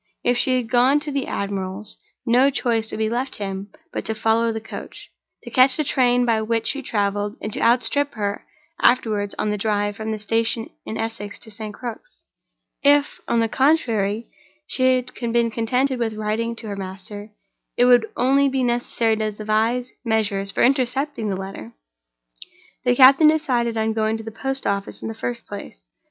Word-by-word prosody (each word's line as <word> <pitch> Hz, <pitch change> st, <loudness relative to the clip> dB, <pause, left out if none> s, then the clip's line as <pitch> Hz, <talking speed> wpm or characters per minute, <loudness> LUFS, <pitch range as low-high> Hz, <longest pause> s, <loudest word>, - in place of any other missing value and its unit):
If 245 Hz, -, +2 dB
she 255 Hz, +1 st, +2 dB
had 235 Hz, -3 st, -4 dB
gone 255 Hz, +4 st, +4 dB
to 300 Hz, -1 st, -3 dB
the 275 Hz, -1 st, -2 dB
admiral's, 195 Hz, +1 st, -4 dB, 0.3 s
no 250 Hz, +4 st, +5 dB
choice 235 Hz, -4 st, 0 dB
would -, -, -5 dB
be 220 Hz, 0 st, 0 dB
left 245 Hz, +4 st, -2 dB
him 195 Hz, 0 st, -5 dB, 0.2 s
but -, -, -3 dB
to 220 Hz, -, -2 dB
follow 225 Hz, +1 st, +2 dB
the 220 Hz, -, -3 dB
coach, 220 Hz, -, -9 dB, 0.3 s
to -, -, -9 dB
catch 255 Hz, 0 st, +5 dB
the 305 Hz, -, +1 dB
train 245 Hz, -3 st, +2 dB
by 225 Hz, -2 st, +2 dB
which 225 Hz, +1 st, -1 dB
she 280 Hz, -, -1 dB
traveled, 205 Hz, -3 st, -1 dB
and 215 Hz, -, -5 dB
to -, -, -1 dB
outstrip 250 Hz, +4 st, +2 dB
her 205 Hz, -2 st, -2 dB, 0.4 s
afterward 215 Hz, -5 st, +2 dB
on 210 Hz, -, 0 dB
the 210 Hz, -, -2 dB
drive 205 Hz, -1 st, 0 dB
from 220 Hz, 0 st, -4 dB
the 215 Hz, -, -2 dB
station 225 Hz, +2 st, -1 dB, 0.2 s
in 220 Hz, -, -4 dB
Essex 215 Hz, -2 st, -4 dB
to 220 Hz, -, -13 dB
St. 215 Hz, -1 st, -7 dB
Crux. 250 Hz, -, -8 dB, 0.6 s
If, 285 Hz, 0 st, +3 dB
on 235 Hz, -, +2 dB
the 225 Hz, -, +2 dB
contrary, 230 Hz, -6 st, +1 dB, 0.4 s
she 255 Hz, 0 st, +2 dB
had 255 Hz, 0 st, -3 dB, 0.2 s
been 235 Hz, 0 st, +2 dB
contented 250 Hz, +4 st, 0 dB
with 225 Hz, -2 st, -1 dB
writing 215 Hz, +2 st, -2 dB
to 230 Hz, -, -9 dB
her 200 Hz, -, -3 dB
master, 200 Hz, +2 st, -7 dB, 0.5 s
it 245 Hz, -, +5 dB
would 245 Hz, -2 st, +5 dB
only 275 Hz, +2 st, +4 dB
be 265 Hz, -1 st, 0 dB
necessary 240 Hz, -2 st, +1 dB
to 215 Hz, 0 st, -1 dB
devise 220 Hz, +4 st, 0 dB
measures 210 Hz, -4 st, 0 dB
for -, -, 0 dB
intercepting 260 Hz, -2 st, +1 dB
the 195 Hz, -, -1 dB
letter. 190 Hz, -, -7 dB, 1.1 s
The 245 Hz, 0 st, +3 dB
captain 270 Hz, +4 st, +8 dB
decided 250 Hz, -7 st, +1 dB
on 220 Hz, 0 st, +1 dB
going 220 Hz, 0 st, 0 dB
to 225 Hz, -, -8 dB
the 225 Hz, -, -7 dB
post 270 Hz, +4 st, -2 dB
office, 200 Hz, 0 st, -2 dB
in -, -, -3 dB
the -, -, -4 dB
first 235 Hz, +1 st, -5 dB
place. 130 Hz, -, -9 dB
225 Hz, 185 wpm, -22 LUFS, 215-250 Hz, 1.1 s, captain